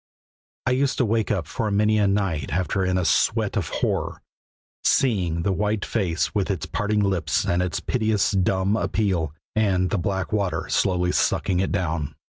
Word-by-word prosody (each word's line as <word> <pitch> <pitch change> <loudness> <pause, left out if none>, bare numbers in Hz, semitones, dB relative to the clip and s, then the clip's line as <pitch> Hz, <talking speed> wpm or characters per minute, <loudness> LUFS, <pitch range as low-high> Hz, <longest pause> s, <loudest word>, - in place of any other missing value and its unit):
I 130 - +2
used 135 +2 +1
to 125 - +2
wake 110 0 0
up - - 0
for 110 - -2
many 105 +1 +2
a 100 - +3
night 95 -7 -1
after 95 +4 0
in 90 0 +1
a 90 - 0
sweat - - +2
of - - -1
horror, - - -2 0.6
seeing 90 -10 +2
the 100 - +1
white 105 +2 -1
face 90 -7 -1
with 100 -2 0
its 95 - -2
parting 105 -1 0
lips 95 -6 0
and 85 +1 +1
its 90 -1 -1
piteous, 110 -5 +1
dumb 95 +1 +1
appeal, 95 -9 0 0.2
and 95 -4 +1
the 105 - +1
black 95 +2 -2
water 95 -7 0
slowly 90 -1 +1
sucking 90 0 +1
it 95 - 0
down. 80 -5 -2
95 Hz, 175 wpm, -24 LUFS, 90-105 Hz, 0.6 s, a